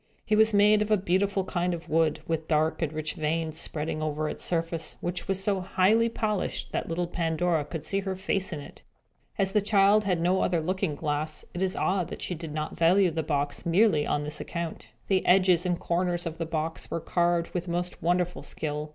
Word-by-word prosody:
It 215 - +3
was 220 +1 +5
made 210 +1 +5
of 210 - -1
a 215 - +4
beautiful 195 +1 +1
kind 180 -1 -1
of 170 - -10
wood, 160 -1 +1
with 160 -1 -2
dark 155 +1 +1
and 160 -3 0
rich 155 -1 -3
veins 160 +1 -1
spreading 155 0 -2
over 155 0 -1
its - - -3
surface, 165 -1 -1
which 175 +1 -4
was 195 0 0
so 195 -1 +1
highly 200 +5 +3
polished 215 -4 -2
that - - -2
little 170 +2 -1
Pandora 170 -1 0
could 155 +1 -6
see 195 - 0
her 190 -1 -3
face 190 0 -1
in 155 -3 -4
it. - - -13 0.6
As 195 -1 +2
the 210 - +3
child 205 +1 +4
had 180 -3 +1
no 180 +3 +2
other 175 -2 +1
looking 185 -1 -1
glass, 150 0 -3
it 175 - -4
is 190 -1 0
odd 185 -2 0
that - - -7
she - - -2
did 165 -2 -7
not 155 0 -4
value 175 +2 +4
the 160 0 -1
box, 145 -2 -2
merely 170 -3 +3
on 145 - 0
this 150 +1 -3
account. 170 -2 -5 0.2
The 190 -2 +2
edges 185 -1 +4
and 175 -1 0
corners 175 0 -1
of 165 0 -5
the 165 - -2
box 160 0 -3
were 165 - -2
carved 170 +1 0
with 180 0 -3
most 175 +1 -3
wonderful 175 +1 0
skill. 150 0 -4
175 Hz, 210 wpm, -27 LUFS, 160-190 Hz, 0.6 s, was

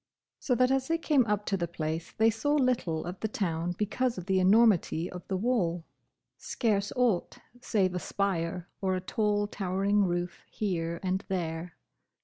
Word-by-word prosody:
So 250 - +1
that 255 +2 +3
as 265 0 +1
they 330 - +1
came 290 -7 +2
up 210 0 0
to 195 - 0
the 175 -2 -1
place 160 -1 -4
they 225 +1 +5
saw 290 +7 0
little 245 - +1
of 180 +2 -6
the 220 - -1
town 175 -4 -2
because 240 +4 0
of 180 - -6
the 190 -1 +2
enormity 190 -4 +4
of 180 - -7
the 190 - -1
wall; 185 -7 0 0.5
scarce 205 -4 0
aught 240 -8 +1 0.2
save 190 -6 +1
a 180 - -1
spire 180 -3 -2
or 190 -1 +1
a - - -1
tall 205 +2 0
towering 200 +1 +1
roof 175 0 -2
here 170 -5 -2
and 190 +1 -1
there. 170 -2 -3
195 Hz, 170 wpm, -29 LUFS, 175-220 Hz, 0.5 s, they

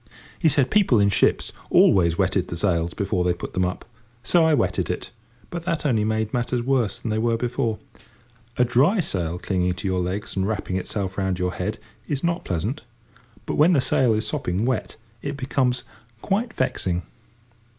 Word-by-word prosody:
He 160 - +4
said 140 -2 +2
people 195 - +4
in 100 0 +4
ships 100 - +2 0.2
always 85 -3 +4
wetted 95 -1 +1
the - - -5
sails 85 -2 0
before 100 -2 0
they 90 0 +1
put - - -7
them 90 - +1
up. 90 +1 -3 0.4
So 170 +7 +4
I 160 - +4
wetted 115 - 0
it; - - -4 0.4
but 170 - -4
that 165 -2 -2
only 115 -7 +2
made 110 0 -1
matters 120 0 0
worse 125 -4 +1
than 115 - -4
they 110 - 0
were 115 0 +1
before. 120 -2 -1 0.8
A 125 - +4
dry 140 - +3
sail 90 - -1
clinging 90 -1 -1
to 100 - -4
your 95 -1 0
legs 90 +4 -3
and 95 0 0
wrapping 100 -3 -2
itself 95 +1 -3
round 95 -2 0
your 90 0 -1
head - - -3 0.3
is 140 -2 -2
not 170 +1 -1
pleasant, 100 - -2 0.6
but, - - -3
when 160 +5 +5
the 150 - +4
sail 125 -3 +3
is 110 - -1
sopping 90 +5 -1
wet, 130 -3 -1 0.3
it 140 0 -4
becomes 130 -2 0 0.4
quite 225 +5 0
vexing. 90 - -1
110 Hz, 185 wpm, -23 LUFS, 95-135 Hz, 0.8 s, when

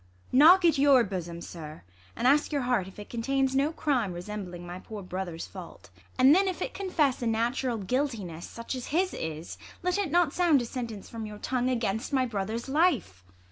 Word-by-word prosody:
Knock 340 +7 +7
at 320 -4 +4
your 275 -3 +6
bosom, 175 -4 -5
sir, 155 -3 -9 0.3
and - - -3
ask 290 +4 +3
your 285 -3 0
heart 245 -7 +1
If 190 - -13
it 210 - -8
contains 265 +3 0
no 280 +3 +2
crime 255 - 0
resembling 180 -1 -6
my 175 +1 -7
Poor 210 +1 -8
brother's 180 -2 -5
fa - - -10
\\t, - - -20 0.3
and 260 +2 +7
then, 385 +3 +4
if 375 - -2
it - - -3
confess 310 -10 0
A 240 - -1
natural 235 +2 0
guiltiness, 210 - -2
such 230 +2 -6
as 255 -2 -5
his 365 +5 +1
is, 160 +1 -6 0.2
Let 360 +2 +1
it 395 -5 0
not 340 -1 +2
sound 340 -6 +4
a - - -4
sentence 230 -4 -6
from 225 -2 -6
your 210 0 -8
tongue 250 +3 -1
Against 230 +1 -1
my 260 -1 +3
brother's 220 +1 -3
life 270 - +1
240 Hz, 200 wpm, -28 LUFS, 195-285 Hz, 0.3 s, Knock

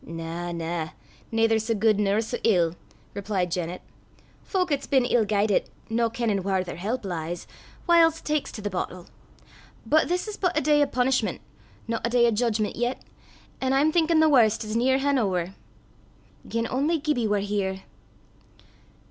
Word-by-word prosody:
"Na, 165 +1 -5
na; 165 -1 -3 0.4
naither 225 0 +3
sae 225 +1 -1
guid 215 0 +2
nor 205 +1 +2
sae 235 +2 -4
ill," 175 -7 +3 0.4
replied 195 -3 -2
Janet. 175 0 -3 0.6
"Fowk 365 -4 -1
'at's 280 -1 -1
been 265 -3 +3
ill 240 -3 +2
guidit, 205 0 +1 0.2
no 230 0 +2
kennin' 225 -4 -1
whaur 190 -1 0
their 175 - -7
help 215 +6 -3
lies, 170 -1 -4 0.4
whiles 330 -2 +5
taks 300 -1 -2
to 215 - -8
the 205 - -1
boatle. 180 -1 -4 0.8
But 310 +1 +3
this 360 +4 -1
is 425 - -6
but 360 -4 0
a - - +3
day 295 +1 +3
o' 290 - +3
punishment, 255 0 0 0.5
no 230 0 -1
a 235 - +1
day 240 0 +4
o' 235 - +3
judgment 220 -1 0
yet, 245 +2 -1 0.6
an' 260 0 +1
I'm 290 +3 +3
thinkin' 325 -1 +3
the 315 - +5
warst's 220 -5 +3
nearhan' 265 +3 +2
ower. 185 -4 -1 1.0
Gien 230 0 -1
only 290 +7 +1
Gibbie 290 -7 0
war 210 0 +1
here!" 195 -1 -2
225 Hz, 165 wpm, -25 LUFS, 195-270 Hz, 1.0 s, whiles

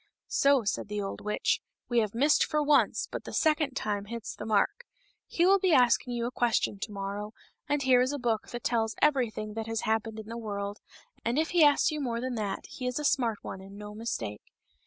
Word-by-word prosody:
" - - -64
So," 275 -3 +3
said 205 - -2
the 210 0 -3
old 195 -1 -4
witch, 210 0 0
" - - -63
we 240 -1 +2
have 215 -1 -1
missed 285 +5 +4
for 300 0 0
once, 295 0 +3
but - - -5
the - - -8
second 305 -4 +2
time 205 -5 -2
hits 230 +1 -6
the 210 - -7
mark; 395 - +1 0.4
he 345 - +1
will 390 +1 +5
be 370 -3 +3
asking 245 -1 +4
you 235 0 -1
a 240 - -2
question 235 -5 +1
to 210 - -5
morrow, 200 +1 -5 0.4
and 290 -1 +1
here 255 -1 +5
is 255 +2 +1
a 290 - -2
book 235 -4 -1
that 240 -1 -6
tells 225 -2 0
everything 235 -7 +1
that 225 0 -4
has 225 0 -2
happened 220 0 -1
in 220 - -7
the 230 +1 -6
world, 200 -2 -4 0.4
and 235 +3 0
if 320 +1 +1
he 345 -2 +5
asks 290 +2 +5
you 305 -1 -3
more 235 -4 -2
than 255 +1 -3
that 210 -4 -3
he 250 - -6
is 250 - -2
a 300 - -2
smart 240 -7 +2
one 190 - -6
and 195 +1 -11
no 210 0 -8
mistake." 120 - -4
235 Hz, 235 wpm, -29 LUFS, 210-275 Hz, 0.4 s, will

